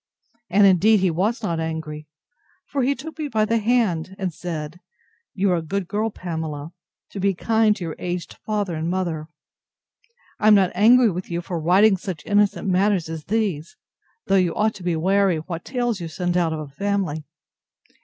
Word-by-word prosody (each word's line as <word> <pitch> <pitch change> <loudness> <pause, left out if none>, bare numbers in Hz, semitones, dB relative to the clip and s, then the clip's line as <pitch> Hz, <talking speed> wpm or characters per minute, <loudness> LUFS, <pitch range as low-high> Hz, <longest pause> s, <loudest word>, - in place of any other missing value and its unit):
And 200 +3 +5
indeed 200 +2 +5
he 185 -2 +2
was 210 +8 -1
not 170 -5 -1
angry; 160 -2 -5 0.6
for 280 - -2
he 270 +3 +2
took 320 +3 -9
me 305 - -2
by 220 -5 +1
the 230 +1 +1
hand, 205 -7 0
and 190 -4 -3
said, 160 -1 -6 0.6
You 195 0 +2
are 175 - +2
a - - -2
good 185 +3 -3
girl, 215 +4 -1
Pamela, 160 -5 -5 0.4
to 200 - -6
be 195 0 +1
kind 220 +2 +2
to 195 - -7
your 165 -2 -4
aged 175 -1 -4
father 205 -4 -1
and 160 +1 -2
mother. 170 -4 -2 1.1
I 215 - +2
am 215 - +8
not 190 -3 +3
angry 230 +4 +5
with 180 +1 -6
you 170 0 -2
for 170 -1 -4
writing 190 +5 +4
such 180 -4 -6
innocent 205 -1 +2
matters 190 -2 +2
as 160 -2 -6
these: 195 -8 -2 0.5
though 195 - +3
you 180 -3 +1
ought 215 +1 +1
to 200 - -12
be 175 -2 0
wary 190 +1 +2
what 165 +1 -6
tales 240 -6 -2
you 170 - -4
send 175 +2 -2
out 170 -2 +2
of 160 - -3
a 155 - -6
family. 185 -1 -2
185 Hz, 190 wpm, -22 LUFS, 165-210 Hz, 1.1 s, am